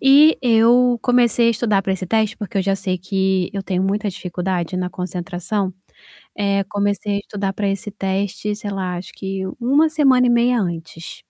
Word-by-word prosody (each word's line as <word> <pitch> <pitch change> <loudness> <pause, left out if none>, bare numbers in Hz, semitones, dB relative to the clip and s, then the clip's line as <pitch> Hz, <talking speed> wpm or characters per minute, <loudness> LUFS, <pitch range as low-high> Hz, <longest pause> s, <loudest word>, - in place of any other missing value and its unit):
e 285 +4 +6
eu 240 0 +4
comecei 240 -2 +3
a - - +5
estudar 210 -3 +1
para 190 - -1
esse 190 -1 -4
teste, 220 +2 +1
porque 205 -3 -6
eu - - +2
já 195 +1 +1
sei 185 -2 -2
que 190 0 0
eu 195 -1 -3
tenho 185 -1 -1
muita 205 +2 0
dificuldade 180 -1 -3
na 180 0 -1
concentração, 180 +2 -3 0.7
eh, 200 -1 +1
comecei 205 0 -1
a - - -1
estudar 200 -1 -4
para 205 +1 -2
esse 195 +1 -3
teste, 200 +1 -2
sei 210 -1 -6
lá, 185 -2 -3
acho 180 - -8
que 195 0 -5 0.2
1 280 +6 +3
semana 270 -5 +4
e - - +3
meia 240 +1 +3
antes, 165 -2 -6
né, - - -49
200 Hz, 190 wpm, -20 LUFS, 190-230 Hz, 0.7 s, e